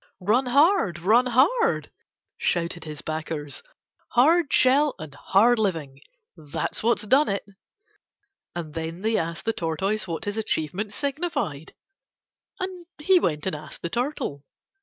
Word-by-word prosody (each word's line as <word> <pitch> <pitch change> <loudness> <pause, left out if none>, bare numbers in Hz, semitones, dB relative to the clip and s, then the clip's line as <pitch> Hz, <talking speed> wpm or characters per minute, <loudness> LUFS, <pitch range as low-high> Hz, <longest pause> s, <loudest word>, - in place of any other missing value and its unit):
"Run 225 +8 +2
hard. 280 - +3
Run 220 +9 +3
hard," 295 - +2 0.4
shouted 170 -1 -1
his 150 -1 -6
backers. 155 -2 -4 0.5
"Hard 305 +5 +4
shell 275 +3 +4
and 155 -2 -9
hard 220 +10 +3
living: 160 -10 -2 0.4
that's 150 -4 -3
what 235 +2 +2
has 210 - -4
done 280 +7 +4
it." 200 0 -2 1.1
And 160 -3 -5
then 165 +2 -5
they 220 +1 +1
asked 165 -3 -2
the 225 - +1
Tortoise 190 +5 -1
what 170 +6 -4
his 205 +1 -3
achievement 200 0 -2
signified, 275 - -3 0.8
and 370 -2 -5
he 360 +5 +4
went 150 - -1
and 190 - -1
asked 150 0 -9
the 170 - -3
Turtle. 240 - -3
205 Hz, 140 wpm, -25 LUFS, 160-260 Hz, 1.1 s, Hard